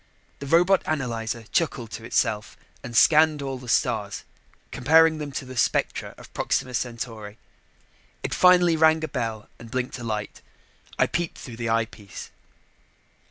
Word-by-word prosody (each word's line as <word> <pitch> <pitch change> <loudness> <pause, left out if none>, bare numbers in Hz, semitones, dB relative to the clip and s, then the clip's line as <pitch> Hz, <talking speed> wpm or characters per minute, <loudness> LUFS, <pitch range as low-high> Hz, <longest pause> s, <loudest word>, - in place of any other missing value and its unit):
The 140 - -7
robot 175 +5 +4
analyzer 115 -6 -2
chuckled 125 -9 -1
to 115 - -7
itself 110 -1 -1 0.3
and 120 0 -4
scanned 155 0 +5
all 135 -1 -4
the 125 -1 -10
stars, 110 -3 0 0.5
comparing 160 +3 +4
them 145 -1 -5
to 135 - -4
the 130 0 -9
spectra - - 0
of - - -15
Proxima 130 - -1
Centauri. 115 -3 -5 0.9
It - - -2
finally 180 -2 +5
rang 160 0 +4
a - - -1
bell 115 -6 -4
and 115 0 -11
blinked 130 +1 -3
a - - -7
light. 105 -2 -4 0.6
I - - +4
peeped 170 -1 -3
through 120 -3 -9
the 115 -1 -3
eyepiece. 115 -3 -3
125 Hz, 150 wpm, -25 LUFS, 115-155 Hz, 0.9 s, scanned